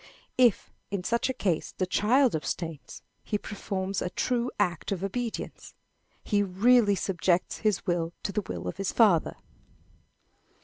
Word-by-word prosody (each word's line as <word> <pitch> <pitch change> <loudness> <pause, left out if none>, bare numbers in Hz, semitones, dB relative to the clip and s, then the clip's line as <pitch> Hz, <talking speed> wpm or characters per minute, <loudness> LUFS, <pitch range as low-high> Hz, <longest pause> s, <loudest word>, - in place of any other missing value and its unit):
If, 240 -5 +3 0.2
in 200 -2 -3
such 235 +6 0
a - - 0
case, 180 -9 -1
the 185 - +1
child 235 - +3
abstains, 160 +1 -5 0.2
he 210 - -1
performs 195 -2 -4
a 180 - -1
true 245 +5 0
act 175 -4 0
of 195 -2 -2
obedience. 230 +3 -4 0.5
He 205 -2 +1
really 205 +3 +4
subjects 180 -2 0
his 215 -2 0
will 170 -3 0
to 200 - -2
the 210 +2 -1
will - - -6
of - - -4
his 195 -1 -1
father. 200 -9 +4
200 Hz, 145 wpm, -28 LUFS, 180-225 Hz, 0.5 s, really